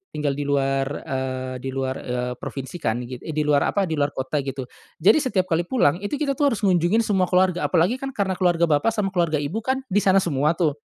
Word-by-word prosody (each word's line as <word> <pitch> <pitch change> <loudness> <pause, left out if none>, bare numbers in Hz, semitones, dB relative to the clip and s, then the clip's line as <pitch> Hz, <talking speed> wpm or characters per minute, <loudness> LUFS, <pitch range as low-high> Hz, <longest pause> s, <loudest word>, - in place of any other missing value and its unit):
tinggal 150 -2 0
di 145 +1 -4
luar 135 -1 +1 0.2
eee, 130 -1 -3
di 135 - -6
luar, 130 0 -2
eee, 125 0 -3
provinsi 135 +6 -6
kan 120 -3 -1
git 125 0 -7
i 155 - -7
di 150 - +1
luar 145 -1 +2
apa, 200 - +1
di 160 -4 -2
luar 145 0 0
kota, 130 +3 -2
gitu. 135 -1 -4 0.3
Jadi 205 - +4
setiap 240 -10 +1
kali 170 +2 +1
pulang, 180 - +2
itu 205 +8 -3
kita 285 -2 -1
tuh 290 - +4
harus 215 -2 -3
ngunjungin 185 +4 +3
semua 190 -4 +1
keluarga. 185 -1 +2
Apalagi 185 +9 +2
kan 270 -1 -6
karena 195 -2 0
keluarga 175 -2 +2
bapak, 160 +7 +2
sama 195 -3 -1
keluarga 170 -4 +1
ibu 150 +9 -2
kan 260 +3 -2
di 205 - +4
sana 195 -1 +3
semua 150 0 +1
tuh 160 -4 +2
165 Hz, 230 wpm, -23 LUFS, 135-195 Hz, 0.3 s, Jadi